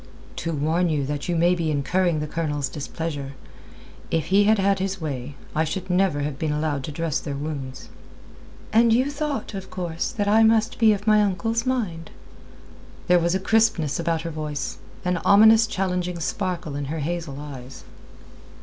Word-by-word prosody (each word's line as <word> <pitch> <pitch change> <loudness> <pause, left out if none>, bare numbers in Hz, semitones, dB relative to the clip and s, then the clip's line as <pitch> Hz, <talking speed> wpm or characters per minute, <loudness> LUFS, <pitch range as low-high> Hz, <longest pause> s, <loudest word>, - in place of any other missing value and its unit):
"To 165 - -2
warn 160 +4 +1
you 145 -3 0
that 145 +3 -4
you 175 - +1
may 170 +2 +4
be 170 -3 -1
incurring 155 +3 +1
the 150 - -3
Colonel's 145 -3 -2
displeasure. 145 -1 -5 0.8
If 160 -2 0
he 205 +1 +6
had 220 +1 +4
had 195 0 +2
his 190 0 -2
way, 140 -3 -5 0.2
I 160 - +3
should 185 +3 -3
never 180 -5 +2
have 145 -1 -3
been 155 -2 -1
allowed 150 -2 -1
to - - -5
dress 160 0 -1
their 145 -3 -5
wounds." 140 -3 -5 0.9
"And 230 +1 +5
you 255 +5 +3
thought, 285 -6 -3
of 190 -1 -6
course, 175 -2 -3
that 205 -4 -2
I 215 +2 +5
must 225 +1 +3
be 225 -2 +6
of 205 0 -5
my 215 -1 +5
uncle's 225 +4 0
mind?" 190 -11 -2 1.0
There 180 0 +5
was 170 +2 +1
a - - +1
crispness 190 -8 +2
about 165 -1 -1
her 165 - -4
voice, 150 -4 -4 0.3
an 180 0 +1
ominous 220 +5 +6
challenging 180 -4 -2
sparkle 175 -2 -3
in 145 0 -3
her 155 +3 -4
hazel 160 -3 -3
eyes. 135 -3 -9
170 Hz, 175 wpm, -24 LUFS, 150-200 Hz, 1.0 s, he